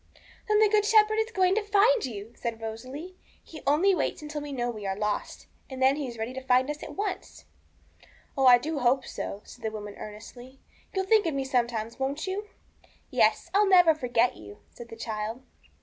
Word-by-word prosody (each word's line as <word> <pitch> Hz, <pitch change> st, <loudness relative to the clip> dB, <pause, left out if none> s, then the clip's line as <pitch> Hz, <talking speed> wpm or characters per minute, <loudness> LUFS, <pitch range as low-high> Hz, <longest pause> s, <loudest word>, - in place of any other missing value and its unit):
'Then 425 Hz, 0 st, +3 dB
the 430 Hz, 0 st, +6 dB
Good 420 Hz, 0 st, +3 dB
Shepherd 435 Hz, 0 st, +4 dB
is 445 Hz, +1 st, 0 dB
going 375 Hz, -3 st, +3 dB
to 435 Hz, -, +1 dB
find 420 Hz, +3 st, +3 dB
you,' 220 Hz, -1 st, -8 dB
said 230 Hz, -2 st, -4 dB
Rosalie; 255 Hz, +11 st, -7 dB, 0.3 s
'He 310 Hz, -3 st, -11 dB
only 335 Hz, +8 st, +4 dB
waits 315 Hz, -2 st, -2 dB
until 300 Hz, 0 st, -5 dB
we 290 Hz, 0 st, -7 dB
know 245 Hz, -3 st, -2 dB
we 210 Hz, -3 st, -6 dB
are 190 Hz, 0 st, -2 dB
lost, 210 Hz, 0 st, -3 dB, 0.2 s
and 265 Hz, -1 st, -7 dB
then 265 Hz, +1 st, +4 dB
He 290 Hz, -2 st, -4 dB
is 235 Hz, -1 st, -8 dB
ready 225 Hz, +3 st, -4 dB
to 265 Hz, -, -6 dB
find 260 Hz, +2 st, +2 dB
us 300 Hz, -, -8 dB
at -, -, -8 dB
once.' 395 Hz, -2 st, -5 dB, 0.9 s
'Oh, 270 Hz, -2 st, +3 dB
I 245 Hz, -1 st, +9 dB
do 295 Hz, +4 st, -3 dB
hope 255 Hz, +1 st, +2 dB
so,'said 215 Hz, +4 st, -7 dB
the 220 Hz, -, 0 dB
woman 210 Hz, -1 st, -7 dB
earnestly; 245 Hz, +5 st, -11 dB, 0.4 s
'you'll 380 Hz, 0 st, 0 dB
think 420 Hz, -2 st, +4 dB
of 315 Hz, -, -1 dB
me 270 Hz, -1 st, -1 dB
sometimes, 235 Hz, -3 st, -1 dB
won't 275 Hz, +5 st, -2 dB
you?' 400 Hz, +2 st, -4 dB, 0.6 s
'Yes, -, -, +2 dB
I'll 405 Hz, 0 st, +4 dB
never 355 Hz, -4 st, +7 dB
forget 245 Hz, -4 st, +1 dB
you,' 105 Hz, -1 st, -13 dB
said 235 Hz, -1 st, -11 dB
the -, -, -9 dB
child. 225 Hz, +2 st, -5 dB
265 Hz, 200 wpm, -27 LUFS, 230-370 Hz, 0.9 s, I